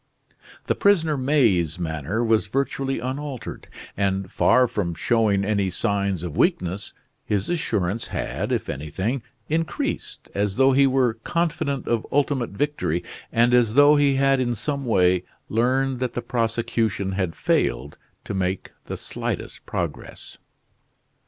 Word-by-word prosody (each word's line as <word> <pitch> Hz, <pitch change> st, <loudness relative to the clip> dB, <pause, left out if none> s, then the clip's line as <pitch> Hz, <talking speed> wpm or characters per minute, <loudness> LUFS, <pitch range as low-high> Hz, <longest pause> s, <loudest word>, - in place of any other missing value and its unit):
The -, -, +2 dB
prisoner 165 Hz, -7 st, +3 dB
May's 115 Hz, -, +2 dB
manner 85 Hz, +5 st, -2 dB
was 110 Hz, -2 st, +2 dB
virtually 135 Hz, +3 st, -1 dB
unaltered; 130 Hz, +1 st, -5 dB, 0.3 s
and 95 Hz, -1 st, -1 dB
far 125 Hz, +1 st, +4 dB
from 85 Hz, -8 st, -2 dB
showing 105 Hz, -4 st, +2 dB
any 100 Hz, -2 st, +1 dB
signs 100 Hz, -1 st, -1 dB
of 85 Hz, -4 st, -5 dB
weakness, 95 Hz, -, 0 dB, 0.3 s
his 100 Hz, -2 st, -1 dB
assurance 110 Hz, -, -1 dB
had, -, -, -3 dB
if -, -, -1 dB
anything, 95 Hz, -, -3 dB, 0.3 s
increased, 165 Hz, +1 st, -2 dB
as 100 Hz, -1 st, 0 dB
though 135 Hz, +1 st, +5 dB
he 135 Hz, +1 st, +5 dB
were 130 Hz, -3 st, +2 dB
confident 140 Hz, +1 st, -2 dB
of 115 Hz, -2 st, 0 dB
ultimate 140 Hz, -4 st, +1 dB
victory 100 Hz, -, -1 dB, 0.3 s
and 120 Hz, +1 st, +3 dB
as 120 Hz, -2 st, +4 dB
though 145 Hz, +1 st, +7 dB
he 145 Hz, -2 st, +3 dB
had 135 Hz, 0 st, +3 dB
in 120 Hz, -2 st, 0 dB
some 140 Hz, +4 st, -3 dB
way 90 Hz, -5 st, +3 dB, 0.3 s
learned 130 Hz, +3 st, +1 dB
that 125 Hz, -2 st, -2 dB
the 120 Hz, -, -3 dB
prosecution 115 Hz, -4 st, -1 dB
had 95 Hz, -3 st, -2 dB
failed 70 Hz, +2 st, 0 dB, 0.3 s
to -, -, -4 dB
make 95 Hz, -1 st, -2 dB
the -, -, -5 dB
slightest -, -, -5 dB
progress. -, -, -5 dB
115 Hz, 135 wpm, -24 LUFS, 95-135 Hz, 0.3 s, though